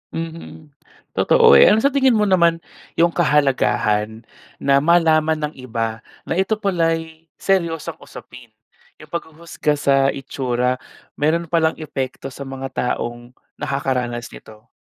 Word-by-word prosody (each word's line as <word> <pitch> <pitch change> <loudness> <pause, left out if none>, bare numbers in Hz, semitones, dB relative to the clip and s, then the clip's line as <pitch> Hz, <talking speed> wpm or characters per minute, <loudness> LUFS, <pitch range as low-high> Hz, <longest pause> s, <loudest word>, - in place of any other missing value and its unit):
Mhm. 165 -2 -8 0.4
Totoo, 465 -2 +4
eh, - - +8
ano 220 +3 +4
sa 280 - +3
tingin 265 -3 +3
mo 210 - +2
naman 170 -4 +2 0.3
'yong 170 +1 +3
kahalagahan, 115 -8 +1 0.3
na 140 0 +2
malaman 160 0 +3
ng - - -19
iba 115 -3 -3 0.2
na 165 - -3
ito 195 +3 +1
pala'y 165 -5 -2
seryosong 170 -5 -1
usapin? 125 -1 -13 0.5
'Yong 155 -1 -15
paghuhusga 160 -2 -3
sa 140 -1 +2 0.2
itsura, 125 -2 -2 0.4
mayroon 160 +2 0
pa 170 - +3
lang 160 0 +1
epekto 135 -3 -5
sa 140 +1 -8
mga 135 0 -6 0.3
taong 120 +1 -7 0.2
nakakaranas 125 -4 -2
nito. 110 0 -14
155 Hz, 130 wpm, -20 LUFS, 130-170 Hz, 0.5 s, eh